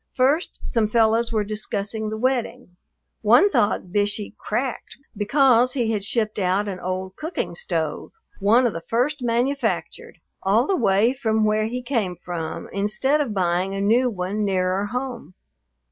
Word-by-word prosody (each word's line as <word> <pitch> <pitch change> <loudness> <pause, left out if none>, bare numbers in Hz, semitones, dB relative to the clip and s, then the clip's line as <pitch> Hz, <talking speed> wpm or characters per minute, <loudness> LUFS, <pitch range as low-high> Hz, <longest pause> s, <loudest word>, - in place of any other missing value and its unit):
First 280 +7 +1
some 225 -2 +1
fellows 225 +1 +2
were 215 -2 +1
discussing 215 0 -3
the 215 - -4
wedding. 250 -4 -2 0.5
One 245 - +5
thought 200 - +1
Bishey 205 +1 -1
"cracked" 245 +3 -4 0.2
because 250 +3 +3
he 235 -4 0
had 210 -3 -1
shipped 215 0 -1
out 195 +2 +1
an 190 -2 -4
old 185 +1 -4
cooking 320 +3 -4
stove, 480 0 -3 0.3
one 225 +5 +4
of 235 - +1
the 165 - -5
first 255 - -1
manufactured, 245 +4 -1 0.2
all 210 +6 +3
the 385 - +1
way 215 - +3
from 220 -4 0
where 215 0 +2
he 250 +2 -4
came 225 -8 -1
from, 165 -2 -5
instead 215 +9 +1
of 235 -8 -3
buying 185 +1 0
a - - -3
new 235 +6 +3
one 200 0 -3
nearer 190 0 0
home. 245 -4 -5
220 Hz, 155 wpm, -23 LUFS, 200-250 Hz, 0.5 s, One